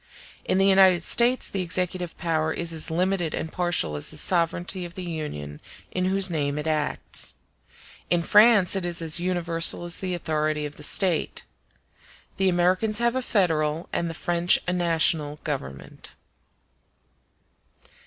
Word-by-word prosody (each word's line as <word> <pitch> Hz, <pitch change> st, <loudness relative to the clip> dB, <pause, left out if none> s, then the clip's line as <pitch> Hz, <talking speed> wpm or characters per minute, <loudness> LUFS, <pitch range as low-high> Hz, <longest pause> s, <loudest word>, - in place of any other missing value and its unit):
In -, -, 0 dB
the 195 Hz, -, +3 dB
United 190 Hz, -3 st, +5 dB
States 240 Hz, +5 st, +2 dB
the 195 Hz, -, -4 dB
executive 180 Hz, 0 st, -3 dB
power 160 Hz, -2 st, -1 dB
is 170 Hz, 0 st, -1 dB
as 160 Hz, -, +2 dB
limited 175 Hz, 0 st, -1 dB
and 160 Hz, -, -5 dB
partial 175 Hz, -, -1 dB
as 75 Hz, -, -1 dB
the -, -, -9 dB
sovereignty 175 Hz, +1 st, 0 dB
of 175 Hz, -1 st, -9 dB
the 185 Hz, -, -6 dB
Union 150 Hz, -, -6 dB, 0.3 s
in 185 Hz, 0 st, -2 dB
whose 190 Hz, 0 st, +2 dB
name 145 Hz, -4 st, -2 dB
it 150 Hz, -, -4 dB
acts; 155 Hz, -2 st, -2 dB, 0.7 s
in 175 Hz, -1 st, +1 dB
France 210 Hz, -2 st, +5 dB
it 195 Hz, -, -2 dB
is 175 Hz, -1 st, -2 dB
as 160 Hz, 0 st, +1 dB
universal 175 Hz, -2 st, +2 dB
as 175 Hz, 0 st, -2 dB
the 185 Hz, -2 st, -3 dB
authority 155 Hz, -2 st, -2 dB
of 145 Hz, 0 st, -8 dB
the -, -, -12 dB
State. 175 Hz, +2 st, +1 dB, 0.9 s
The 190 Hz, -1 st, +2 dB
Americans 185 Hz, +5 st, +1 dB
have 235 Hz, 0 st, +1 dB
a 260 Hz, -, 0 dB
federal 165 Hz, -8 st, 0 dB
and 170 Hz, -, -1 dB
the 165 Hz, -, -7 dB
French 175 Hz, +1 st, +3 dB
a 180 Hz, -, 0 dB
national 165 Hz, -4 st, 0 dB
Government. 130 Hz, -, -7 dB
175 Hz, 155 wpm, -24 LUFS, 155-185 Hz, 0.9 s, United